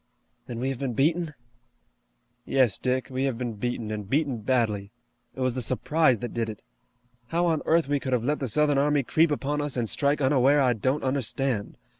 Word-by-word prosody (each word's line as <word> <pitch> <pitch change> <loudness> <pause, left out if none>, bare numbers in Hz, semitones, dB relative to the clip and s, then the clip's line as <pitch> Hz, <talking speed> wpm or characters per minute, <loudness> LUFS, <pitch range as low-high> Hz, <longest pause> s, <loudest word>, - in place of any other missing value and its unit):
"Then 120 - -6
we 130 +2 -1
have 135 -2 -4
been 135 -3 -2
beaten?" 160 +3 +1 1.1
"Yes, 125 -5 +2
Dick, 130 +1 -1
we 130 +1 -1
have 130 -4 -1
been 120 -2 -3
beaten, 110 0 -3
and 105 -2 -5
beaten 140 -3 0
badly. 105 -4 0 0.4
It 130 - -6
was 130 -1 +1
the 130 - -3
surprise 130 +3 +2
that - - -7
did 115 -1 -1
it. 105 - -9 0.6
How 170 +6 0
on 160 -3 +1
earth 165 -2 +3
we 145 0 +1
could 130 - -4
have 120 -2 +1
let 150 +4 0
the 135 - -2
Southern 145 +4 +2
army 145 0 +2
creep 160 +6 +3
upon 145 0 -1
us 145 -3 -1
and 120 -2 0
strike 140 +5 +1
unaware 135 +1 +4
I 130 -3 +3
don't 130 +6 -1
understand. 130 -3 -1
130 Hz, 200 wpm, -26 LUFS, 120-145 Hz, 1.1 s, unaware